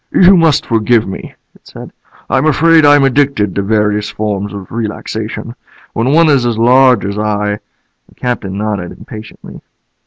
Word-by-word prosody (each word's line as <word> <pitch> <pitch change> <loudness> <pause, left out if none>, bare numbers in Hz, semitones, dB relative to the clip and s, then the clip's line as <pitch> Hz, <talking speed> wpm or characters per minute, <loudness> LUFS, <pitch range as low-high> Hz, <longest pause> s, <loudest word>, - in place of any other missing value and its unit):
"You 190 +1 +5
must 165 -4 +2
forgive 115 0 +1
me," 95 - -8 0.2
it - - -24
said. - - -11 0.3
"I'm 135 +3 +1
afraid 160 +1 +4
I'm 145 -1 +5
addicted 135 -7 +1
to 100 - -1
various 105 0 0
forms 105 -1 -4
of 100 -3 -9
relaxation. 110 0 -5 0.4
When 120 +4 0
one 165 +2 +4
is 140 -5 +3
as 120 -2 -1
large 125 -1 +4
as 100 +1 -4
I 105 -1 -2 0.2
" - - -44
The - - -24
Captain 110 -6 -4
nodded 105 -4 -3
impatiently. 110 0 -12
110 Hz, 160 wpm, -13 LUFS, 105-135 Hz, 0.4 s, You